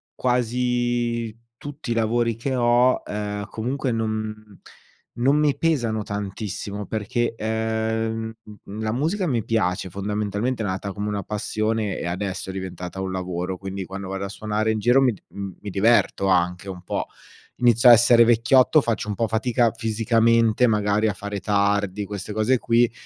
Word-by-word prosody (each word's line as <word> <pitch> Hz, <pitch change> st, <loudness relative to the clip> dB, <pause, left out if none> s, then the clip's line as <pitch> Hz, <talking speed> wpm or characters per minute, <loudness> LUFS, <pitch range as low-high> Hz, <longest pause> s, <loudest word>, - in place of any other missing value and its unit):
quasi 120 Hz, -2 st, 0 dB, 0.2 s
tutti 145 Hz, -3 st, -7 dB
i -, -, +3 dB
lavori 115 Hz, 0 st, +1 dB
che 130 Hz, +3 st, -2 dB
ho, 120 Hz, +1 st, +3 dB
ehm, 105 Hz, -1 st, -4 dB
comunque 125 Hz, +3 st, -2 dB
non 110 Hz, -2 st, -4 dB, 0.6 s
non 135 Hz, +4 st, +3 dB
mi 150 Hz, -2 st, +2 dB
pesano 120 Hz, -10 st, 0 dB
tantissimo 100 Hz, 0 st, -5 dB
perché, 115 Hz, +3 st, -2 dB
ehm, 110 Hz, 0 st, -2 dB, 0.5 s
la 110 Hz, 0 st, -1 dB
musica 170 Hz, -, 0 dB
mi 120 Hz, -7 st, 0 dB
piace, 95 Hz, -5 st, 0 dB
fondamentalmente 105 Hz, +4 st, -2 dB
è -, -, -2 dB
nata 95 Hz, +1 st, -3 dB
come 105 Hz, 0 st, -3 dB
una 100 Hz, -1 st, -2 dB
passione 110 Hz, +1 st, -2 dB
e -, -, -4 dB
adesso 95 Hz, +1 st, -3 dB
è -, -, -4 dB
diventata 95 Hz, 0 st, -6 dB
un 95 Hz, -, -3 dB
lavoro, 90 Hz, 0 st, -3 dB
quindi 95 Hz, 0 st, -5 dB
quando 95 Hz, 0 st, -7 dB
vado 95 Hz, +1 st, -4 dB
a 100 Hz, -, -4 dB
suonare 110 Hz, +1 st, -1 dB
in 110 Hz, -, -1 dB
giro 125 Hz, +5 st, +4 dB
mi 130 Hz, -, +4 dB
d 105 Hz, -, -11 dB
uhm, 100 Hz, -2 st, -7 dB
mi 105 Hz, -, -7 dB
diverto 100 Hz, 0 st, +2 dB
anche 90 Hz, +1 st, +1 dB
un 90 Hz, -2 st, -7 dB
po'. -, -, -3 dB, 0.5 s
Inizio 120 Hz, 0 st, +5 dB
a -, -, +11 dB
essere 120 Hz, 0 st, +7 dB
vecchiotto, 120 Hz, +6 st, +5 dB
faccio 110 Hz, -3 st, -2 dB
un -, -, -1 dB
po' 115 Hz, -, 0 dB
fatica 115 Hz, +1 st, +1 dB
fisicamente 115 Hz, +1 st, +2 dB
magari 105 Hz, -1 st, +2 dB
a -, -, -1 dB
fare 105 Hz, 0 st, -5 dB
tardi, 100 Hz, 0 st, +1 dB
queste 100 Hz, 0 st, -6 dB
cose 110 Hz, +5 st, +2 dB
qui, 120 Hz, 0 st, +2 dB
110 Hz, 160 wpm, -23 LUFS, 100-120 Hz, 0.6 s, a